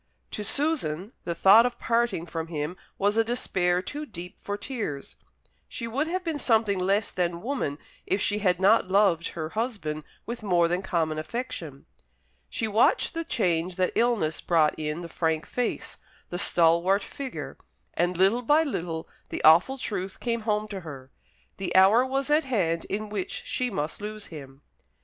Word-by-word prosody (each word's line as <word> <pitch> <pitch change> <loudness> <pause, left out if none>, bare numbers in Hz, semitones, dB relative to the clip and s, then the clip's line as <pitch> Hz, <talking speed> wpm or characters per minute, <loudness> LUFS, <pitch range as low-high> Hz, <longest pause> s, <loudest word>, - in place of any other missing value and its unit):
To 210 - -4
Susan 215 - +2
the 170 - -2
thought 200 +6 +7
of 245 -1 -2
parting 230 -7 0
from 165 -1 -5
him 155 +1 -4 0.2
was 205 +2 +1
a 225 - +5
despair 185 -6 0
too 295 +8 -6
deep 180 -5 -9
for 205 0 -4
tears. 205 - -5 0.5
She 230 - -5
would 275 +7 -1
have 365 +2 -2
been 325 -4 -2
something 220 -6 +2
less 200 +3 +1
than 175 -1 -2
woman 235 - -2 0.3
if 190 - +1
she 205 +1 +1
had 180 -3 +1
not 200 +1 +4
loved 190 -4 +3
her 155 -1 -3
husband 195 -9 -3 0.2
with 235 +1 -5
more 175 -5 +3
than 175 +2 -1
common 165 -5 -1
affection. 165 - -5 0.6
She 225 - -2
watched 220 - +3
the 330 0 -2
change 180 - 0
that 185 -1 +1
illness 225 -10 +1
brought 160 -3 +3
in 155 +2 -3
the 170 - -6
frank 160 -1 -1
face, 245 -2 -3 0.3
the 175 - -2
stalwart 175 +4 +3
figure; 275 -2 -7 0.4
and 175 0 0
little 195 +6 +3
by 295 +6 +4
little 170 - -4 0.2
the - - -5
awful 170 +12 +6
truth 195 -6 -4
came 235 -1 -1
home 210 0 +1
to 200 -2 -5
her. 135 -6 -10 0.5
The 185 -3 -4
hour 195 +6 +7
was 270 +2 -1
at 300 0 +3
hand 175 -10 0
in 215 +1 -4
which 200 -3 -4
she 250 0 -1
must 155 -3 -3
lose 215 0 -5
him. 135 -2 -11
195 Hz, 170 wpm, -26 LUFS, 170-230 Hz, 0.6 s, thought